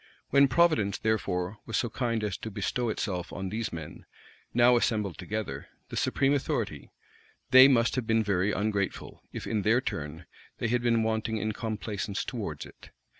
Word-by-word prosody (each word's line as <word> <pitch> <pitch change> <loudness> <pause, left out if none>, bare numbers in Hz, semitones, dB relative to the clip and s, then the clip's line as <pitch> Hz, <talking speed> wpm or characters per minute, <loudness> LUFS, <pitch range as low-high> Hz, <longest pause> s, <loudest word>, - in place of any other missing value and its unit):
When 140 +1 +6
providence, 130 -9 +3
therefore, 105 -2 -1
was 110 - -1
so - - +1
kind 115 -2 -1
as 105 -4 -1
to 110 - -6
bestow 120 +3 -2 0.4
on 95 -1 -4
these 110 +2 -3
men, 80 -2 -8 0.4
now 120 +1 +5
assembled 105 -6 0
together, 105 +3 -4 0.2
the - - -6
supreme 140 +1 +2
authority, 140 - -2 0.6
they 130 0 +10
must 115 -4 +3
have 120 -3 -2
been 115 0 +3
very 100 -1 +1
ungrateful, 100 -1 -2
if, - - -6
in 110 - 0
their 110 +4 +3
turn, 80 - -5 0.3
they 120 - -1
had 120 +1 +1
been 115 -2 +2
wanting 110 0 -1
in 110 0 -1
complaisance 105 -3 -3
towards - - -5
it. - - -15
110 Hz, 165 wpm, -28 LUFS, 100-120 Hz, 0.6 s, they